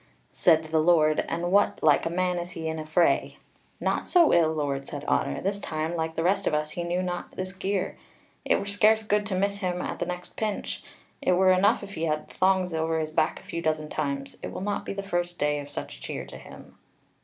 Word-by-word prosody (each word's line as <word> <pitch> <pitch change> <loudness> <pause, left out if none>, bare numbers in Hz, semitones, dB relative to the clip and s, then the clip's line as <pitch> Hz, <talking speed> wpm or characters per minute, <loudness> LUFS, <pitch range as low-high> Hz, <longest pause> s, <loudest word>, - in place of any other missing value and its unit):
Said 160 -2 +4
the 160 0 0
Lord: 155 -2 +4
"And 175 +2 -2
what 200 +1 +3
like 150 +1 +4
a - - -1
man 180 +1 0
is 175 +1 -6
he 160 -1 -4
in 160 0 -3
a 155 - -6
fray?" 170 +2 +2 0.4
"Naught - - -1
so 345 -3 +5
ill, 165 -2 +4
Lord," 140 -3 -2
said 145 0 -6
Otter. - - +1
"This 200 +1 -1
time, 160 -1 -3
like 160 -1 -2
the 165 - -1
rest 195 +2 +2
of 150 - +2
us, 150 0 -1
he 175 - -4
knew 175 +2 -1
not 175 -1 -4
this 185 0 -4
gear. 195 0 -2 0.4
It - - +3
were - - -2
scarce 215 +2 +3
good 210 -1 +1
to 195 - -1
miss 200 +2 0
him 180 -3 -1
at - - -4
the - - -2
next 180 0 -6
pinch. 215 -2 -3 0.4
It 180 - +3
were 185 +1 +5
enough 185 +3 +3
if 200 0 -8
he 165 - -2
had 155 -1 -1
the - - -14
thongs 185 -1 +2
over 160 0 0
his 155 0 -3
back 155 - +1
a - - -19
few 170 - -5
dozen 155 -2 -1
times; 140 -2 -3
it - - -5
will - - -6
not 205 +1 -2
be - - -2
the 200 0 -4
first 175 -2 -2
day 150 0 +1
of 145 0 -8
such - - -7
cheer - - -5
to - - -10
him." - - -14
175 Hz, 240 wpm, -27 LUFS, 155-190 Hz, 0.4 s, so